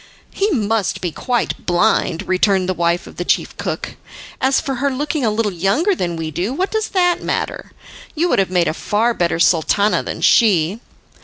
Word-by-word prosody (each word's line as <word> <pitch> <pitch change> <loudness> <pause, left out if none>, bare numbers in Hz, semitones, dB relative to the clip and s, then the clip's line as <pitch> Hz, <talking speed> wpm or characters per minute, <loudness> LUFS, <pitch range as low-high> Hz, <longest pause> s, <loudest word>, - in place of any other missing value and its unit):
"He 400 +2 0
must 220 - 0
be 175 - -3
quite 245 +7 -2
blind," 175 -1 +1
returned 185 0 +2
the 185 - 0
wife 170 0 0
of - - -13
the - - -2
chief - - 0
cook. - - -5 0.4
"As 265 +1 +3
for 270 -2 -3
her 280 - +2
looking 290 +2 -2
a 225 - +2
little 210 0 0
younger 200 - +1
than 175 - -2
we 160 -1 -4
do, 180 - -2
what 375 +5 -1
does 440 0 -1
that 355 -3 +1
matter? - - -3 0.4
You 330 +3 +1
would - - +2
have 190 - +1
made 180 -2 +1
a - - 0
far 220 +7 0
better 170 -4 0
Sultana 185 +5 +2
than - - -6
she." 200 -3 +3
205 Hz, 190 wpm, -18 LUFS, 175-270 Hz, 0.4 s, As